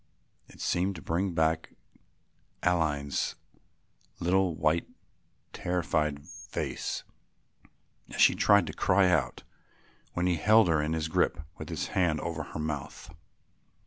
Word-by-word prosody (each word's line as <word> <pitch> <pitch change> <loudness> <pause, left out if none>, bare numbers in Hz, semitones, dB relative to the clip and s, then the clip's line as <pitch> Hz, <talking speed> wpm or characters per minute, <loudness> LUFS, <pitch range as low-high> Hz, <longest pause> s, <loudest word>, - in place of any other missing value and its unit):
It - - -17
seemed 95 +3 0
to 80 - -8
bring 90 +3 -1
back 80 0 0 0.9
Aline's 75 -5 0 0.8
little 90 -1 +2
white 80 +1 +1 0.7
terrified 75 -5 -1
face - - -4 1.1
as - - -7
she - - +7
tried 100 -3 +4
to 80 - -6
cry 95 -1 +3
out 80 -5 0 0.7
when 90 - -1
he 90 -2 +2
held 110 -1 +5
her 80 -2 +3
in 75 +2 -1
his 80 -1 -1
grip 80 - +1 0.2
with - - -7
his - - -3
hand 85 -5 +1
over 85 -1 -3
her 75 - -7
mouth. 75 -1 -5
85 Hz, 125 wpm, -29 LUFS, 75-90 Hz, 1.1 s, she